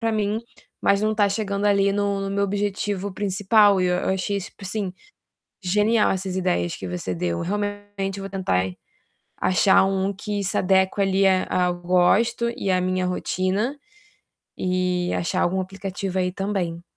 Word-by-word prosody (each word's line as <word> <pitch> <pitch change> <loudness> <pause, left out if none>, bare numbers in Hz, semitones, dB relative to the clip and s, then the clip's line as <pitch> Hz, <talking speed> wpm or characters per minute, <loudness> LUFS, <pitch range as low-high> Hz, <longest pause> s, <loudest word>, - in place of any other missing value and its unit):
pra 225 -1 0
mim. 215 +1 0 0.4
Mas 200 0 +3
não 215 0 +2
tá 205 -1 +4
chegando 200 0 -2
ali 200 -1 +3
no 200 -1 0
no 195 - -3
meu 200 0 +1
objetivo 200 0 -2
principal. 205 +1 +3
E 180 - +2
eu 180 +1 0
achei 190 +1 -1
super, 195 - -11
assim, 195 -1 -3 0.7
genial 210 +4 +3
essas 190 -1 -2
ideias 85 - 0
que 95 - -7
você 90 +1 -4
deu. 85 0 -2
Realmente 205 0 -3
eu - - -6
vou 195 - -5
tentar 95 - 0 0.7
achar 185 +2 +4
um 195 +1 0
que 205 +1 -4
se 195 - -2
adeque 190 +1 +2
ali 195 0 +2
a 185 -1 +2
ao 180 - +1
gosto 220 +7 +2
e 195 - -3
à 185 -1 +3
minha 185 0 0
rotina 185 +7 -1 0.8
e 180 -1 0
achar 170 - -1
algum 190 +2 +1
aplicativo 190 0 -4
aí 180 0 0
também. 185 -4 -3
195 Hz, 165 wpm, -23 LUFS, 185-205 Hz, 0.8 s, tá